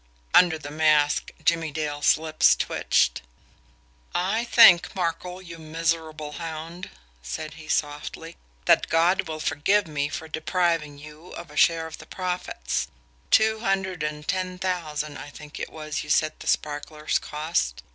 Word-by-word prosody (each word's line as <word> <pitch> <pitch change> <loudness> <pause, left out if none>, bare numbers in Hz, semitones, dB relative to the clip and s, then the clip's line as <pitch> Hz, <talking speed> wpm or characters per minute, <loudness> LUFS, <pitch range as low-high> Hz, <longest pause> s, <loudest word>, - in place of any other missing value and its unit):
Under 175 -3 +6
the 145 -2 -9
mask, 150 -1 +3 0.2
Jimmie 165 -1 +2
Dale's 145 -1 +1
lips 155 0 +3
twitched. - - +1 0.9
"I 195 +6 0
think, 225 -8 +7
Markel, 180 +1 -3
you 170 -2 -10
miserable 160 -1 -2
hound," 165 +3 -7 0.3
said 155 - -6
he 155 0 -12
softly, 150 +2 -3 0.3
"that - - +4
God 175 +3 +3
will 155 -1 -5
forgive 160 +7 +2
me 145 -2 -2
for 160 - -6
depriving 160 -2 -1
you 150 +3 -13
of 170 -3 -9
a - - -13
share 165 +1 +3
of 160 - -9
the - - -12
profits. 180 - -3 0.4
Two 220 0 +4
hundred 190 -5 -1
and 150 0 -4
ten 185 -1 -2
thousand, 155 -5 -3
I 145 - -8
think 150 +1 -11
it - - -4
was, 155 -1 -5
you 150 - -11
said 155 +1 +2
the - - -10
sparklers 150 +1 -1
cost." 150 - -2
160 Hz, 145 wpm, -25 LUFS, 150-180 Hz, 0.9 s, think